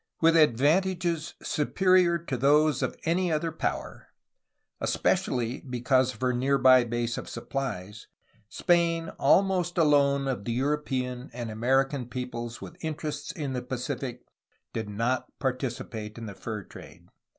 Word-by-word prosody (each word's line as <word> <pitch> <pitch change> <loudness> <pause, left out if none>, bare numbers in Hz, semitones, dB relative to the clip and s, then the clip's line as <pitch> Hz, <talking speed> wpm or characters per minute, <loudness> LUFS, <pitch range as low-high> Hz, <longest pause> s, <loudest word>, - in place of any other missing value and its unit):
"With 165 0 +5
advantages 165 +4 +2
superior 180 +2 +3
to 165 -5 -4
those 145 +2 +3
of - - -2
any 175 +2 +1
other 160 +1 0
power, 165 - -4 0.7
especially 120 0 0
because 130 0 +1
of - - -18
her 125 0 +2
near 135 +3 +2
by 130 -2 +6
base 120 0 -2
of - - -8
supplies, 110 -6 -5 0.4
Spain 170 +1 +1
al 195 - +5
most 180 -3 -1
alone 140 -3 +3
of 125 -7 -2
the 115 - -2
European 130 -2 -2
and 120 -2 -5
American 130 +3 +1
peoples 120 -2 -5
with 175 - -11
in 160 -1 -2
terests 150 -2 -5
in 145 -4 -4
the 125 - -2
Pacific 125 0 -4 0.5
did 110 -2 -3
not 115 +5 -2
participate 120 -5 -4
in 115 - -6
the 105 - -6
fur 105 +1 -6
trade. - - -13
135 Hz, 140 wpm, -28 LUFS, 120-155 Hz, 0.7 s, by